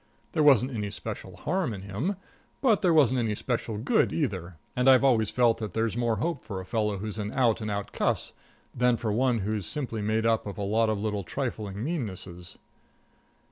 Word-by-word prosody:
There - - +1
wasn't 135 -3 +5
any 105 -3 -2
special 100 -3 -7
harm 170 - -1
in 95 - -8
him, 110 - -2 0.4
but 230 -7 +3
there 180 - +4
wasn't 135 -6 +4
any 110 -3 0
special 115 -2 -2
good, 115 +6 +2
either, 95 - -2 0.2
and 125 +1 +4
I 130 - +9
always 120 -5 +3
feel 120 +1 +4
that 110 -2 -6
there's 115 -1 0
more 120 -2 +1
hope 165 +4 -2
for 95 -3 -5
a 95 - -7
fellow 105 -1 0
who's 110 +2 -5
an 105 0 -3
out 115 -4 +2
and 110 - -3
out 100 -1 -3
cuss - - 0 0.4
than 125 -1 +3
for 110 -2 -2
one 120 -1 +2
who's 105 -3 -2
simply 125 -7 -3
made 110 +2 0
up 115 -2 +2
of 100 - -6
a 100 - -3
lot 110 +3 +2
of 110 - 0
little 105 -1 -2
trifling 105 -1 -4
meannesses. 95 - -5
110 Hz, 200 wpm, -28 LUFS, 105-125 Hz, 0.4 s, I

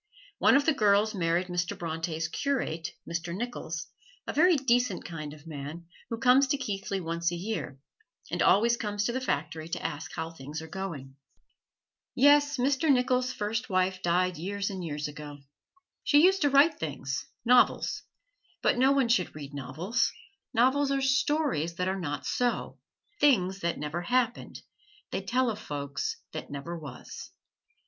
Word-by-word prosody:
One - - +5
of 280 0 +4
the 320 - +4
girls 210 -3 +3
married 175 -1 +1
Mr. 175 -1 -2
Bronte's 165 -1 -3
curate, 170 - -2
Mr. 170 +1 -3
Nicholls, 195 -7 -4 0.4
a - - -4
very 350 +4 +5
decent 245 - +1
kind 155 -4 -6
of 150 +1 -13
man 155 +2 -7 0.2
who 230 - -3
comes 255 +3 +5
to 285 - +1
Keighley 200 -5 -3
once 170 0 -1
a - - -3
year, 180 -7 -4 0.5
and - - -1
always 235 +4 +4
comes 205 -2 -2
to 235 - 0
the 260 +2 -2
factory 160 - -2
to - - -4
ask 150 -1 -4
how 160 0 -4
things 150 0 -7
are 160 - -8
going. 155 -7 -6 1.0
Yes, 290 +1 +5
Mr. 275 +4 +2
Nicholls' 255 0 +2
first 220 +4 -3
wife 185 0 +1
died 180 +1 +1
years 200 +4 -3
and 190 -2 -5
years 150 -2 -3
ago. 150 -1 -8 0.7
She 295 +1 +5
used 385 +2 +5
to 290 - +4
write 285 +3 +5
things 135 -3 -4 0.2
novels; 245 +1 +4 0.6
but - - +3
no 265 +2 +5
one 270 -3 +3
should 230 -9 +1
read 145 -2 -8
novels; 150 - -1 0.4
novels 260 +4 +3
are 275 0 +1
stories 265 - +1
that 180 +1 -1
are 190 +1 -1
not 145 -5 -4
so 245 -1 -1 0.4
things 195 -10 +3
that 170 -2 -1
never 150 +4 -3
happened; 245 +5 -1 0.5
they - - -2
tell 250 -1 +1
of 210 - -6
folks 145 - -4
that - - -6
never 145 +4 -5
was. 145 -6 -9
190 Hz, 160 wpm, -29 LUFS, 160-250 Hz, 1.0 s, One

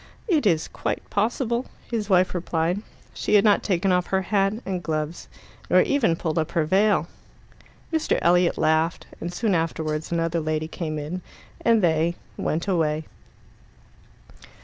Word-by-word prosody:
"It 310 - +2
is 160 -4 +2
quite - - -4
possible," 235 +3 0 0.2
his 220 -3 -2
wife 185 -1 +4
replied. 175 +1 -1 0.3
She - - 0
had 205 - +6
not 210 -2 +4
taken 190 -1 +1
off 180 -1 +2
her 190 0 0
hat 195 +1 +1
and 185 -2 -2
gloves, 155 0 -3 0.4
nor 185 - +6
even 245 -12 +2
pulled 165 -1 -1
up 155 - -2
her 165 -2 +2
veil. 190 -1 +3 0.9
Mr. 320 -1 +1
Elliot 175 0 +4
laughed, 160 +2 +1
and 170 - -4
soon 210 +3 0
afterwards 160 -2 -1
another 165 0 0
lady 155 0 -1
came 160 -2 -4
in, 155 +5 -4 0.4
and 230 -3 +4
they 165 0 +2 0.2
went 165 +5 -2
away. 160 -4 +1
175 Hz, 150 wpm, -24 LUFS, 160-200 Hz, 0.9 s, had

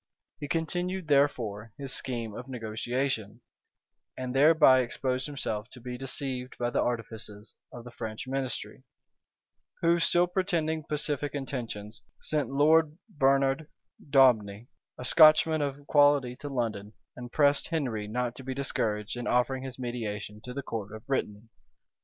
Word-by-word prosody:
He 145 - -5
continued, 175 +3 -2
therefore, 115 -7 +1
his 135 -1 -3
scheme 120 -6 -3
of 125 +5 -8
negotiation, 120 -1 -3 0.8
and 125 -1 -4
thereby 145 -1 +6
exposed 130 +1 -2
himself 115 -6 -4
to 125 - -11
be 125 +1 -6
deceived 130 0 -4
by 120 0 -1
the - - +1
artifices 110 -3 -4 0.2
of 120 - -9
the 120 - -10
French 110 -1 -6
ministry; 130 -1 -4 1.0
who, 170 +1 +4
still 175 +1 +4
pretending 170 -4 -1
pacific 145 -1 -2
intentions, 115 -6 -5 0.2
sent 150 -2 -1
Lord 155 +2 +4 0.2
Bernard 135 +1 +2 0.4
Daubigni, 120 -6 +3 0.3
a 125 - -6
Scotchman 155 +1 +6
of 140 0 -3
quality, 145 -4 +4
to 145 - -7
London, 110 -5 -3 0.2
and 125 0 -8
pressed 145 -1 +3
Henry 125 -11 -2
not 120 +2 -2
to 135 - -9
be 130 0 -4
discouraged 110 -6 -1
in 120 0 -4
offering 125 +2 +1
his 130 -1 -7
mediation 105 -4 -5
to 125 - -6
the 140 - -4
court 110 -5 -5
of 110 +2 -11
Brittany. 105 -6 -2
130 Hz, 140 wpm, -29 LUFS, 115-145 Hz, 1.0 s, thereby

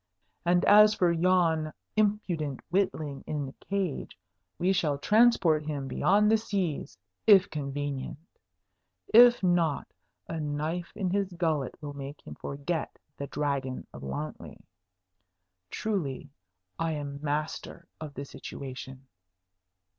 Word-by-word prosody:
And 175 +1 +3
as 210 +1 +7
for 175 -2 +3
yon 165 -2 +2 0.2
impudent 190 -10 0
witling 160 -7 -1
in 150 -2 -2
the 135 - -8
cage, 195 -7 -3 0.4
we 185 +2 +2
shall 150 -6 +1
transport 210 -4 +4
him 140 -3 -3
beyond 210 +8 +3
the 225 - +6
seas, 190 - -2 0.3
if 200 -4 +7
convenient; 145 -2 -4 1.0
if 240 -1 +8
not, 175 -5 +1 0.3
a 165 - -4
knife 155 +3 -3
in 190 -4 -1
his 200 -1 0
gullet 160 -6 -1
will 145 -1 -5
make 140 +1 -7
him 75 - -8
forget 145 - -4 0.2
the 140 - -5
Dragon 140 -3 -2
of - - -9
Wantley. 70 +3 -6 1.1
Truly, 150 -10 -3 0.5
I 165 -1 0
am 145 -1 -5
master 150 +3 -3
of 150 -3 -8
the 140 - -5
situation!" 135 -1 -8
155 Hz, 120 wpm, -29 LUFS, 140-185 Hz, 1.1 s, if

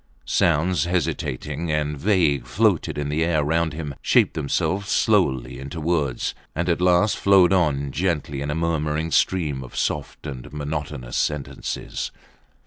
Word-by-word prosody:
Sounds 85 +4 +2
hesitating 80 -2 -2
and 75 -1 0
vague 75 - +2
floated 70 - +1
in 75 -1 -2
the 75 +2 +1
air 80 -3 +2
round 80 +2 +1
him, 75 -2 -5
shaped - - +3
themselves 90 +7 -1
slowly 65 - +2
into 70 +4 -6
words; 75 -6 0 0.2
and 85 +3 -1
at 85 0 +1
last 90 +3 +4
flowed 95 -2 +5
on 70 -6 +1
gently 75 -4 -1
in 70 - -3
a 75 - -1
murmuring 80 -1 -1
stream 75 -9 +1
of 65 - -11
soft - - -2
and 65 -5 -7
monotonous 75 -4 -4
sentences. 75 -2 -3
75 Hz, 140 wpm, -23 LUFS, 70-85 Hz, 0.2 s, flowed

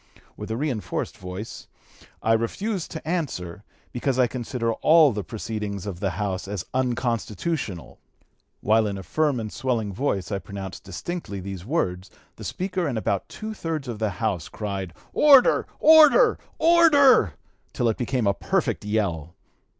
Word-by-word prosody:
With - - -8
a 110 - -2
reinforced 125 - -3
voice 95 +4 -7 0.6
'I 115 - +3
refuse 180 - -1
to 160 -1 -8
answer, 105 - -3 0.3
because 130 +1 -1
I 130 - +5
consider 120 -1 -2
all 155 +3 +5
the 105 -2 -4
proceedings 105 0 -5
of 95 -4 -5
the 95 - 0
House 95 -3 -2
as 100 -3 -4
unconstitutional' 120 - -2 0.6
While 110 +1 +3
in 100 -1 -3
a 95 - -7
firm 150 +2 0
and 110 -2 -5
swelling 115 -6 -1
voice 100 -5 -2
I 100 - -1
pronounced 95 +1 -8
distinctly 100 - -5
these 95 -1 -7
words, 95 - -1 0.3
the - - -9
Speaker 185 -2 -2
and 125 -5 -2
about 100 -3 -1
two 220 0 -6
thirds 160 -8 -4
of 115 -3 -5
the 110 -1 0
House 100 -8 -2
cried, 100 -4 -5 0.2
'order! 280 -4 +6
order! 315 - +7 0.2
order!' 285 - +5 0.4
till 120 - 0
it 110 - 0
became 125 -1 -1
a 100 - +3
perfect - - -1
yell. 90 -7 -2
110 Hz, 150 wpm, -24 LUFS, 100-155 Hz, 0.6 s, order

